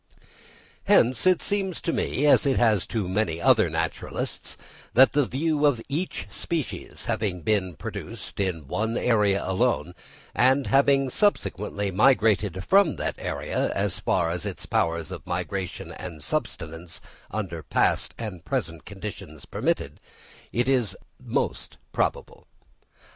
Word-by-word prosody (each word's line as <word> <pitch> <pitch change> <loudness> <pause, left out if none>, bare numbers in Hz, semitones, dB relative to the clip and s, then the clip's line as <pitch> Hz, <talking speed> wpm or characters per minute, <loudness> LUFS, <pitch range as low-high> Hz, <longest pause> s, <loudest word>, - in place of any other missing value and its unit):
Hence, 125 +9 +4
it 185 -2 +4
seems 195 -3 -1
to 165 - -1
me, 145 - 0
as 145 - +5
it 135 - +2
has 110 -7 +3
to 110 -6 -2
many 90 -4 0
other - - +4
naturalists, - - -3 0.4
that 130 +3 +7
the 145 -3 +2
view 150 +2 0
of 145 -5 +4
each 140 - -2
species 160 +6 -4
having 95 -4 -1
been 95 -2 0
produced - - -7
in 85 -7 -2
one 110 - -1
area 105 -5 +2
alone, 95 -5 +1 0.4
and 130 +2 +4
having 135 -1 +3
subsequently 105 - 0
migrated 105 -4 +3
from 195 -4 +4
that - - -2
area - - -2
as - - 0
far 80 - +1
as 85 0 -3
its 100 -3 -5
powers 85 -2 0
of - - -8
migration 95 -2 -3
and 85 -5 -8
subsistence 85 - -4 0.3
under 90 -6 -4
past - - +1
and 100 -7 -6
present 80 0 -3
conditions 95 -7 -8
permitted, - - -2 0.5
is 125 -2 +1
the - - -14 0.3
most - - -2 0.2
probable. - - -2
105 Hz, 130 wpm, -26 LUFS, 90-135 Hz, 0.5 s, that